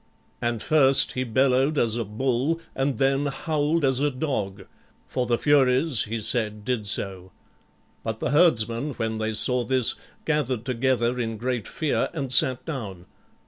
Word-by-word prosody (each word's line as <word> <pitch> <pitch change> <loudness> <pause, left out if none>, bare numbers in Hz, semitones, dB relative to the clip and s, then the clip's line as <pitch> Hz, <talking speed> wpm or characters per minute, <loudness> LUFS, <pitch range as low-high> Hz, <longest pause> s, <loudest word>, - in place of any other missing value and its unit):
And 120 -2 -2
first 140 -3 +5
he 130 - -2
bellowed 130 +4 +1
as 115 -4 +2
a 120 - -1
bull 130 +8 -1
and 135 -2 -1
then 135 +2 +1
howled 150 +2 -1
as 130 -1 +1
a 145 +1 +1
dog, 105 -9 -4 0.4
for 125 -2 -3
the 120 - +1
Furies, 135 -1 +2
he 115 +2 -4
said, 105 -1 -1
did 120 -5 -2
so. 95 -3 -2 0.7
But 110 -1 -4
the 125 - -2
herdsmen, 140 -4 +2
when 110 -2 -3
they 110 0 -2
saw 125 +3 +3
this, 130 -1 +3 0.3
gathered 130 -7 -1
together 125 -1 0
in 115 -2 -3
great 125 -1 -3
fear 155 -3 -1
and 135 -6 -3
sat 130 0 +3
down. 105 - -6
125 Hz, 155 wpm, -24 LUFS, 110-135 Hz, 0.7 s, first